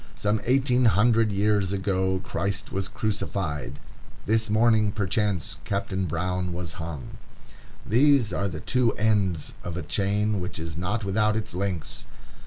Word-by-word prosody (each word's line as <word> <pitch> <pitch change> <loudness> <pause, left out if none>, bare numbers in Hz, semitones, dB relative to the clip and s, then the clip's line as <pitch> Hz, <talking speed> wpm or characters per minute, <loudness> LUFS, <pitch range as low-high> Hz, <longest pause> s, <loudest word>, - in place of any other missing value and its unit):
Some 105 +1 0
eighteen 130 0 +3
hundred 110 +1 +4
years 100 -1 +2
ago 95 -1 0
Christ 100 +1 -3
was 95 0 -2
crucified; 95 -10 -3 0.5
this 110 +1 +1
morning, 110 -1 +4
perchance, 100 -2 -1
Captain 100 -3 -2
Brown 90 +2 -1
was 90 +2 -6
hung. 80 -6 -7 0.7
These 125 -3 +4
are 100 +2 0
the 80 -3 -6
two 125 -3 +2
ends 100 -7 +1
of 85 -1 -4
a 90 - -3
chain 105 +5 0
which 90 +2 -4
is 80 0 -5
not 100 +7 -2
without 105 +2 +2
its 110 -2 -3
links. 90 -3 -3
100 Hz, 140 wpm, -26 LUFS, 90-110 Hz, 0.7 s, hundred